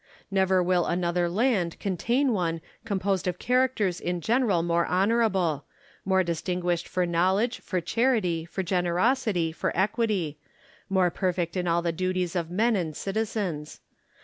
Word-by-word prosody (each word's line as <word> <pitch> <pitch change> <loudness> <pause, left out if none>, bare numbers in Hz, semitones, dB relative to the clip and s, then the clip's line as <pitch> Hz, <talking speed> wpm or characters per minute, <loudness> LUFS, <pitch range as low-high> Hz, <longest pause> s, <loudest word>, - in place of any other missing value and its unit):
Never 190 -1 +3
will 180 -1 +2
another 175 0 0
land 195 -4 +1
contain 235 - +1
one 165 -4 -1 0.3
composed 195 -3 -1
of 180 -1 -1
characters 250 -7 +1
in 175 0 -2
general 220 -3 +2
more 170 0 +1
honourable; 190 -6 +1 0.4
more 190 -1 +3
distinguished 175 0 -2
for 180 -1 0
know 175 +2 +2
ledge, 230 +4 0
for 185 - -2
charity, 185 -3 +1
for 180 +3 -4
generosity, 180 +1 +1
for 160 - -2
equity; 195 -7 0 0.5
more 185 -2 +2
perfect 175 -2 -1
in 180 -1 -1
all 170 0 +1
the 170 - +1
duties 185 +1 -2
of 170 -2 -1
men 220 +6 +2
and 165 -6 -2
citizens. 195 -7 -3
185 Hz, 145 wpm, -26 LUFS, 170-210 Hz, 0.5 s, Never